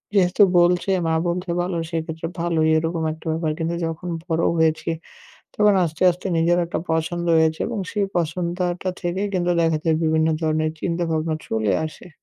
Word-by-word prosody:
যেহেতু 190 Hz, +1 st, +4 dB, 0.2 s
বলছে 175 Hz, +2 st, +3 dB, 0.2 s
মা 160 Hz, -, +1 dB
বলছে 180 Hz, +1 st, -2 dB
ভালো 175 Hz, 0 st, -1 dB
সেক্ষেত্রে 160 Hz, 0 st, -3 dB
ভালোই 165 Hz, -2 st, +1 dB
এরকম 165 Hz, +1 st, -1 dB
একটা 160 Hz, -, -16 dB
ব্যাপার। 160 Hz, 0 st, -1 dB
কিন্তু 165 Hz, +1 st, -1 dB
যখন 165 Hz, +2 st, -5 dB, 0.2 s
বড় 165 Hz, -1 st, 0 dB
হয়েছি 160 Hz, 0 st, +1 dB, 0.7 s
তখন 210 Hz, -1 st, +4 dB
আস্তে 160 Hz, 0 st, -4 dB
আস্তে, 180 Hz, +2 st, -5 dB
নিজের 170 Hz, +2 st, +3 dB
একটা 170 Hz, -, -3 dB
পছন্দ 165 Hz, +2 st, -1 dB
হয়েছে 160 Hz, 0 st, +2 dB
এবং 235 Hz, -2 st, -3 dB
সেই 205 Hz, -2 st, 0 dB
পছন্দ 170 Hz, +1 st, -1 dB
আ -, -, 0 dB
টা 185 Hz, -, 0 dB
থেকেই 190 Hz, +3 st, -1 dB
কিন্তু 175 Hz, -1 st, +1 dB
দেখা 165 Hz, -2 st, +2 dB
যায় 160 Hz, -2 st, +3 dB
বিভিন্ন 160 Hz, 0 st, +2 dB
ধরনের 155 Hz, -1 st, +1 dB
চিন্তাভাবনা 165 Hz, -2 st, -1 dB
চলে 110 Hz, -3 st, 0 dB
আসে। 155 Hz, -, -12 dB
165 Hz, 170 wpm, -22 LUFS, 160-175 Hz, 0.7 s, যেহেতু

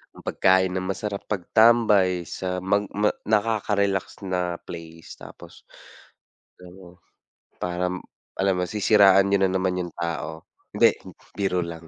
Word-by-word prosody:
Ang -, -, -15 dB
pagkain 95 Hz, 0 st, +2 dB
ng 95 Hz, 0 st, -3 dB
masarap, 100 Hz, +1 st, -4 dB
pagtambay, 105 Hz, -3 st, +3 dB
sa 90 Hz, +1 st, -4 dB
mag 100 Hz, +1 st, 0 dB
ma 105 Hz, +1 st, 0 dB, 0.2 s
nakaka-relax 100 Hz, -3 st, 0 dB
na 90 Hz, -2 st, -2 dB
place, 80 Hz, -1 st, -11 dB
tapos -, -, -14 dB, 1.0 s
pero, 90 Hz, 0 st, -15 dB, 0.6 s
parang, 90 Hz, +1 st, -2 dB, 0.4 s
alam 95 Hz, 0 st, +2 dB
mo, 90 Hz, -, 0 dB
sisiraan 100 Hz, -1 st, +4 dB
niyo 100 Hz, -, +3 dB
na 95 Hz, -, +2 dB
naman 95 Hz, -1 st, 0 dB
yung 85 Hz, -, -9 dB
tao. 85 Hz, -1 st, -5 dB, 0.3 s
Hindi, -, -, +4 dB, 0.4 s
biro 95 Hz, -3 st, 0 dB
lang, 85 Hz, -1 st, -9 dB
95 Hz, 125 wpm, -24 LUFS, 90-100 Hz, 1.0 s, sisiraan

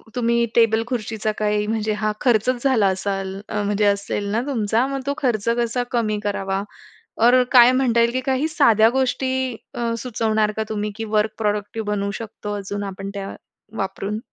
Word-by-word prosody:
तुम्ही 235 Hz, -1 st, +2 dB
टेबल-खुर्चीचा 225 Hz, -1 st, +1 dB
हा -, -, 0 dB
काही 210 Hz, 0 st, 0 dB
म्हणजे 215 Hz, -1 st, -1 dB
हा 215 Hz, -1 st, +1 dB
खर्चच 245 Hz, 0 st, +2 dB
झाला 245 Hz, -8 st, +3 dB
असाल 195 Hz, 0 st, -3 dB, 0.2 s
म्हणजे 210 Hz, 0 st, 0 dB
असेल 200 Hz, 0 st, 0 dB
ना 230 Hz, +2 st, +1 dB
तुमचा 230 Hz, -2 st, +1 dB
मग 275 Hz, -1 st, -3 dB
तो 280 Hz, -, +1 dB
खर्च 235 Hz, -7 st, -1 dB
कसा 240 Hz, +1 st, 0 dB
कमी 215 Hz, -3 st, 0 dB
करावा? 195 Hz, -1 st, -1 dB, 0.6 s
और 245 Hz, +2 st, +5 dB
काय 245 Hz, -1 st, +8 dB
म्हणता 255 Hz, -3 st, +2 dB
येईल 235 Hz, 0 st, +3 dB
की 255 Hz, -, 0 dB
काही 270 Hz, +4 st, +1 dB
साध्या 230 Hz, -8 st, +5 dB
गोष्टी 260 Hz, -1 st, -1 dB, 0.2 s
अ, 235 Hz, -1 st, -1 dB
सुचवणार 220 Hz, -3 st, 0 dB
का 220 Hz, -, 0 dB
तुम्ही 210 Hz, -1 st, -2 dB
की 225 Hz, -, -4 dB
वर्क 210 Hz, +1 st, +2 dB
प्रॉडक्टिव्ह 210 Hz, 0 st, -2 dB
बनवू 200 Hz, -1 st, -1 dB
शकतो 210 Hz, -2 st, -6 dB
अजून 205 Hz, +1 st, -4 dB
आपण 195 Hz, 0 st, -6 dB
त्या 195 Hz, -1 st, -5 dB, 0.4 s
वापरून? 195 Hz, +2 st, -3 dB
220 Hz, 170 wpm, -22 LUFS, 205-240 Hz, 0.6 s, काय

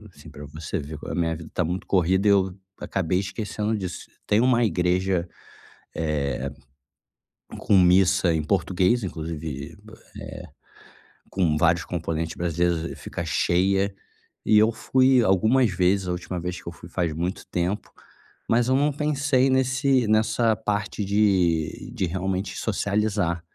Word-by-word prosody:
assim, -, -, -15 dB
pra 75 Hz, -, -10 dB
você 75 Hz, +1 st, -5 dB
ver 75 Hz, +1 st, -7 dB
como -, -, -7 dB
a -, -, -3 dB
minha 80 Hz, -2 st, 0 dB
vida 80 Hz, 0 st, -10 dB
tá 90 Hz, -, +1 dB
muito 90 Hz, +3 st, -3 dB
corrida 95 Hz, +2 st, +2 dB
e 100 Hz, -, +6 dB
eu 95 Hz, -2 st, +2 dB, 0.3 s
acabei 90 Hz, -1 st, -1 dB
esquecendo 105 Hz, +2 st, -3 dB
disso. 90 Hz, -3 st, -6 dB, 0.2 s
Tem 105 Hz, +2 st, +3 dB
uma 125 Hz, -1 st, +3 dB
igreja, 90 Hz, -2 st, 0 dB, 2.2 s
eh, -, -, -6 dB
com 100 Hz, -, +3 dB
missa 90 Hz, 0 st, +4 dB
em 80 Hz, -1 st, 0 dB
português, 95 Hz, +6 st, +1 dB
inclusive 80 Hz, -4 st, -6 dB
b -, -, -15 dB
eh, -, -, -10 dB, 1.3 s
com 85 Hz, -6 st, +1 dB
vários 85 Hz, +1 st, +2 dB
componentes 80 Hz, -2 st, -3 dB
brasileiros 85 Hz, 0 st, 0 dB
e -, -, -6 dB
fica -, -, -6 dB
cheia. 95 Hz, +3 st, +1 dB, 0.5 s
E 105 Hz, -, +5 dB
eu 110 Hz, +2 st, +4 dB
fui 130 Hz, +2 st, +3 dB
algumas 110 Hz, +5 st, +3 dB
vezes, 90 Hz, +1 st, +1 dB
a 90 Hz, -, 0 dB
última 90 Hz, 0 st, -4 dB
vez 90 Hz, +1 st, -4 dB
que -, -, -22 dB
eu -, -, -6 dB
fui 85 Hz, 0 st, -13 dB
faz 85 Hz, -2 st, -1 dB
muito 85 Hz, +4 st, -3 dB
tempo, 90 Hz, +4 st, -2 dB, 0.6 s
mas 120 Hz, +1 st, +3 dB
eu 130 Hz, -, +3 dB
não 145 Hz, +2 st, +2 dB
pensei 145 Hz, -2 st, +1 dB
nesse 130 Hz, -1 st, +2 dB
nessa 110 Hz, +1 st, +2 dB
parte 105 Hz, -1 st, -2 dB
de 95 Hz, -6 st, +1 dB
de 95 Hz, -, -1 dB
realmente 95 Hz, +2 st, -3 dB
socializar. 100 Hz, -4 st, -1 dB
95 Hz, 150 wpm, -24 LUFS, 85-110 Hz, 2.2 s, e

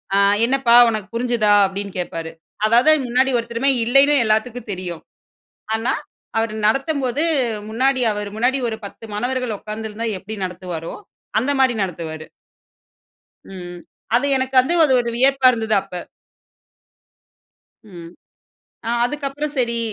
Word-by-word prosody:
ஆ, -, -, +4 dB, 0.3 s
"என்னப்பா 260 Hz, -2 st, +2 dB, 0.2 s
உனக்கு 215 Hz, -3 st, -3 dB
புரிஞ்சதா?" 235 Hz, -3 st, +1 dB, 0.2 s
அப்டீன்னு 200 Hz, 0 st, -5 dB
கேட்பாரு. 165 Hz, -2 st, -4 dB, 0.3 s
அதாவது 240 Hz, +7 st, +5 dB
முன்னாடி 255 Hz, +2 st, +2 dB
ஒருத்தருமே 235 Hz, +3 st, -1 dB
இல்லேன்னு 275 Hz, +5 st, +4 dB
எல்லாத்துக்கும் 220 Hz, +2 st, -1 dB
தெரியும். 180 Hz, -3 st, -5 dB, 0.7 s
ஆனா, 235 Hz, +4 st, -1 dB, 0.4 s
அவர் 225 Hz, -1 st, 0 dB
நடத்தும்போது 275 Hz, +2 st, 0 dB, 0.5 s
முன்னாடி 260 Hz, +3 st, +1 dB
அவர் 205 Hz, -1 st, -4 dB
முன்னாடி 250 Hz, +4 st, +1 dB
ஒரு 220 Hz, -1 st, -3 dB
10 225 Hz, -, -10 dB
மாணவர்கள் 245 Hz, 0 st, -2 dB
உக்காந்திருந்தா 220 Hz, +1 st, -5 dB
எப்பிடி 210 Hz, +3 st, -8 dB
நடத்துவாரோ, 180 Hz, -2 st, -6 dB, 0.5 s
அந்த 270 Hz, +5 st, 0 dB
மாரி 260 Hz, -2 st, +4 dB
நடத்துவாரு. 160 Hz, -3 st, -6 dB, 1.2 s
ம். 175 Hz, -2 st, -9 dB, 0.4 s
அது 255 Hz, +4 st, +2 dB
எனக்கு 260 Hz, 0 st, -3 dB
வந்து 275 Hz, +7 st, -2 dB
அது 265 Hz, -, +2 dB
ஒரு 235 Hz, -, -4 dB
வியப்பா 270 Hz, 0 st, +4 dB
இருந்தது 220 Hz, -2 st, -1 dB
அப்ப. 180 Hz, -1 st, -7 dB, 1.9 s
ம். 170 Hz, -2 st, -11 dB, 0.8 s
அ -, -, -2 dB, 0.2 s
அதுக்கப்பறம் 290 Hz, +2 st, -4 dB
சரி. 235 Hz, -1 st, 0 dB
230 Hz, 120 wpm, -20 LUFS, 200-260 Hz, 1.9 s, அதாவது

